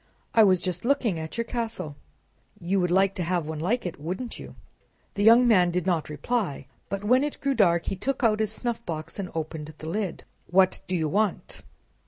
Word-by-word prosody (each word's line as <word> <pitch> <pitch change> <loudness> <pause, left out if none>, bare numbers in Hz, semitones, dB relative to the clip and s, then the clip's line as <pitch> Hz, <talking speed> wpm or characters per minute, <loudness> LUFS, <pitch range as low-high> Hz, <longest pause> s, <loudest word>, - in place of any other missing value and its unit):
"I 225 - +7
was 185 -3 +4
just 180 -1 -2
looking 235 - +1
at 160 +4 -6
your 230 - -1
castle." 225 - -4 0.6
"You 190 +3 0
would 180 -1 +1
like 190 +2 +3
to 185 - -3
have 170 -2 -1
one 155 -1 -4
like 215 +9 0
it, 175 - -5
wouldn't 185 +10 -5
you?" - - -10 0.6
The 205 - -3
young 235 +3 +7
man 185 -6 +5
did 180 0 -1
not 170 -5 0
reply, 175 - -2 0.2
but 200 +1 -3
when 250 +6 +4
it 295 - -3
grew 275 0 0
dark 170 -8 +3
he - - -2
took 265 +7 -3
out 215 -2 +3
his 215 -1 0
snuffbox 220 -9 -4
and 190 -2 -3
opened 155 -1 -5
the 155 - -8
lid." 195 +2 -3 0.3
What 185 +1 +3
do 185 - -1
you 160 -3 0
want?" 205 +4 -1
190 Hz, 205 wpm, -26 LUFS, 170-230 Hz, 0.6 s, I